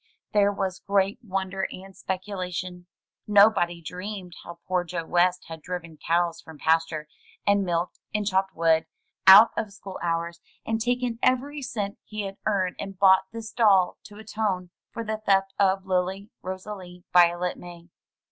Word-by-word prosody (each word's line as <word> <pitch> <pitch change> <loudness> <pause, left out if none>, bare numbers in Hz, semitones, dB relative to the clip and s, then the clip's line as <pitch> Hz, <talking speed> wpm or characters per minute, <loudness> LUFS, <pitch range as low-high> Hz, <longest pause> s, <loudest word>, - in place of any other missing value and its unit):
There 205 -1 +4
was 195 -2 -3
great 200 +2 +1
wonder 190 -3 -2
and 190 +1 -11
speculation. 185 -2 -5 0.4
Nobody 200 -5 +4
dreamed 180 +1 -6
how 170 0 -9
poor 180 -1 +1
Joe 170 -1 -5
West 180 +1 +2
had 160 -1 -8
driven 170 -1 -6
cows 170 +2 0
from 160 -1 -13
pasture, 160 -1 +1 0.4
and 200 0 +3
milked, 175 -1 -2
and 210 0 -1
chopped 190 -1 0
wood, 165 -1 +2 0.4
out 200 +4 +10
of 215 -2 -3
school 195 -1 -9
hours, 170 0 -2 0.3
and 225 0 -1
taken 245 0 -1
every 280 +3 +1
cent 210 -6 -4
he 215 -1 -5
had 195 0 -6
earned 190 -4 0
and 195 -1 -6
bought 190 0 +5
this 225 0 -7
doll 200 -6 +3
to 205 - -12
atone 205 -4 -3 0.2
for 230 - -5
the 215 0 -3
theft 195 -1 +2
of 195 -1 +2
Lily 190 +2 -1
Rosalie 185 -1 -7
Violet 175 0 +4
May. 175 -1 -11
190 Hz, 155 wpm, -26 LUFS, 175-205 Hz, 0.4 s, out